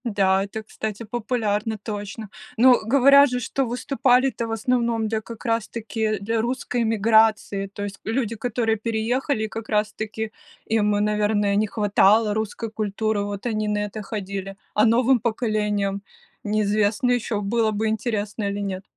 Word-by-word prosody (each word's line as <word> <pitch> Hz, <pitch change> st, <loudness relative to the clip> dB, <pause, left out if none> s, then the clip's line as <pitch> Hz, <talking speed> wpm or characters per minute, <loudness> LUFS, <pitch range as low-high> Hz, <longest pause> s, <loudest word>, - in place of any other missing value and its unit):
Да, 195 Hz, -3 st, +2 dB
это, 220 Hz, +2 st, -6 dB
кстати, 215 Hz, 0 st, -5 dB
популярно 220 Hz, -1 st, -2 dB
точно. 210 Hz, +1 st, -6 dB, 0.3 s
Но 250 Hz, +2 st, +6 dB
говорят 280 Hz, +4 st, +6 dB
же, 250 Hz, 0 st, -1 dB
что 270 Hz, +2 st, -1 dB
выступали-то 250 Hz, -1 st, +1 dB
в -, -, -5 dB
основном 230 Hz, 0 st, 0 dB
для 220 Hz, 0 st, -1 dB
как 230 Hz, 0 st, -10 dB
раз 225 Hz, -2 st, 0 dB
таки 220 Hz, -1 st, -2 dB
для 225 Hz, +3 st, -1 dB
русской 245 Hz, 0 st, -2 dB
эмиграции. 220 Hz, -2 st, +2 dB
То 205 Hz, +1 st, -7 dB
есть 200 Hz, -1 st, -6 dB
люди, 230 Hz, 0 st, -1 dB
которые 225 Hz, 0 st, -1 dB
переехали, 230 Hz, +2 st, -1 dB
как 225 Hz, 0 st, -7 dB
раз 210 Hz, -1 st, +1 dB
таки 220 Hz, 0 st, -4 dB, 0.3 s
им 210 Hz, -2 st, +1 dB
и, -, -, +1 dB
наверное, 210 Hz, -1 st, +1 dB
не 215 Hz, +1 st, +2 dB
хватало 210 Hz, +1 st, +3 dB
русской 220 Hz, +1 st, -3 dB
культуры, 215 Hz, 0 st, -1 dB
вот 205 Hz, +1 st, -5 dB
они 215 Hz, -3 st, -1 dB
на 210 Hz, 0 st, 0 dB
это 210 Hz, +1 st, -7 dB
ходили. 195 Hz, -2 st, -5 dB, 0.2 s
А 210 Hz, -, +4 dB
новым 245 Hz, +3 st, +4 dB
поколениям 210 Hz, -3 st, -1 dB, 0.4 s
неизвестно 210 Hz, +3 st, +1 dB
ещё, 230 Hz, -3 st, -1 dB
было 220 Hz, +2 st, +1 dB
бы 215 Hz, +1 st, -1 dB
интересно 215 Hz, -1 st, -2 dB
или 200 Hz, 0 st, -3 dB
нет. 190 Hz, -1 st, -4 dB
220 Hz, 155 wpm, -23 LUFS, 205-230 Hz, 0.4 s, Но